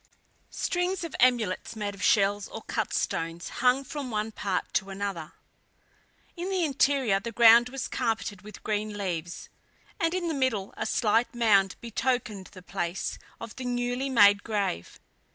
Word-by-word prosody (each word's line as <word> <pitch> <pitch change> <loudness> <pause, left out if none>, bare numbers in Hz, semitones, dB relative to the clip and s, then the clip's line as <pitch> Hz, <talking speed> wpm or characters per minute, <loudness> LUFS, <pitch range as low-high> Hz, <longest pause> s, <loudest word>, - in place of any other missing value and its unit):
Strings 360 +1 -1
of 335 - -5
amulets, 235 -6 +2
made 205 -2 -3
of 200 - -11
shells 205 0 +3
or - - -8
cut - - -2
stones, 165 +1 -2
hung 255 +2 +4
from 275 0 -6
one 215 -1 -2
part 200 -3 -3
to 195 - 0
another. 195 -5 -4 1.0
In 355 +1 -4
the 375 -2 0
interior, 270 -7 +2
the 230 +4 -6
ground 235 +1 +7
was 270 0 -4
carpeted 225 -5 -2
with 210 +1 -12
green 210 0 -2
leaves, 175 -4 -4 0.5
and 330 +1 +1
in 360 -2 -1
the 325 - -1
middle, 260 -8 -1
a - - -3
slight 230 +2 +1
mound 200 -5 +3
betokened 230 -4 -2
the 185 -2 -12
place 180 -1 -3 0.2
of 230 -1 -8
the 260 - -5
newly 245 +2 -1
made 205 -5 +6
grave. 200 - -3
220 Hz, 155 wpm, -27 LUFS, 200-255 Hz, 1.0 s, ground